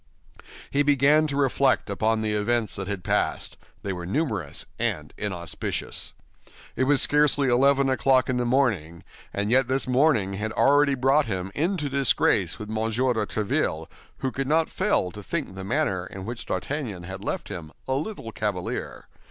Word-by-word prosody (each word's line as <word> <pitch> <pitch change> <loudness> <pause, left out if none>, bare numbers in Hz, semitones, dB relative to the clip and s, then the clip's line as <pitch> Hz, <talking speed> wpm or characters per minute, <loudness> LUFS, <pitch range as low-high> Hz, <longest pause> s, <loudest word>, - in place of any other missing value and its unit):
He 140 - +2
began 145 +2 +4
to 140 - -3
reflect 140 0 +2
upon 110 +2 0
the 110 -1 -1
events 110 +1 0
that 95 -1 -5
had 100 -3 -4
passed; - - -1 0.3
they 100 - -2
were 90 -1 -6
numerous 105 - -2
and 75 -1 -2
inauspicious. 90 -5 -3 0.6
It 130 - +1
was 145 0 +4
scarcely 145 -2 +3
eleven 135 +2 +4
o'clock 130 -1 +3
in 125 - 0
the 125 - +1
morning, 105 - 0 0.3
and 100 +2 -2
yet 130 0 +4
this 135 +1 0
morning 125 -7 +3
had 105 +3 -3
already 140 0 +4
brought 135 +2 +3
him 95 -2 -3
into 165 0 0
disgrace 140 -2 +2
with 105 - -7
M. 110 +1 -4
de 115 -2 0
Tréville, 80 -6 -1 0.3
who 130 - -2
could 135 +1 -3
not 160 +2 +2
fail 185 - +1
to 105 - -9
think 150 - -3
the 95 0 -7
manner 95 -5 0
in 95 -1 -8
which 120 +1 -6
D'Artagnan 105 -3 -3
had 95 +2 -7
left - - -3
him 85 -6 -7 0.2
a 130 - 0
little 140 - -4
cavalier. 105 -5 -4
120 Hz, 170 wpm, -25 LUFS, 100-140 Hz, 0.6 s, began